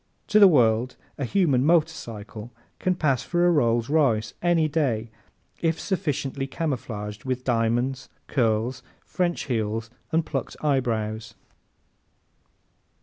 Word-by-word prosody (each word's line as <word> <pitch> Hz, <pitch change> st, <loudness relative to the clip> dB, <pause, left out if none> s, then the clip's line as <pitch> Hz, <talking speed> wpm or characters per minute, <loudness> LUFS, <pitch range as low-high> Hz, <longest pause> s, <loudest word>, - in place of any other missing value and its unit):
To 210 Hz, -, +5 dB
the 200 Hz, -, +10 dB
world 120 Hz, -6 st, +3 dB, 0.2 s
a 140 Hz, -, -1 dB
human 140 Hz, -4 st, +2 dB
motorcycle 120 Hz, -9 st, -1 dB, 0.3 s
can 185 Hz, 0 st, +1 dB
pass 140 Hz, -8 st, +1 dB
for 175 Hz, 0 st, +1 dB
a 175 Hz, -, +5 dB
Rolls 120 Hz, -6 st, +2 dB
Royce 125 Hz, -8 st, +2 dB
any 170 Hz, -2 st, +3 dB
day 125 Hz, -8 st, -1 dB, 0.5 s
if 165 Hz, -1 st, 0 dB
sufficiently 145 Hz, -7 st, -2 dB
camouflaged 115 Hz, -9 st, -4 dB
with 130 Hz, -1 st, -2 dB
diamonds, 120 Hz, +2 st, 0 dB, 0.2 s
curls, 120 Hz, 0 st, 0 dB, 0.2 s
French 175 Hz, -2 st, -1 dB
heels 115 Hz, -2 st, -2 dB, 0.2 s
and 160 Hz, 0 st, +1 dB
plucked -, -, -4 dB
eyebrows. 110 Hz, -6 st, -1 dB
130 Hz, 115 wpm, -25 LUFS, 115-160 Hz, 0.5 s, the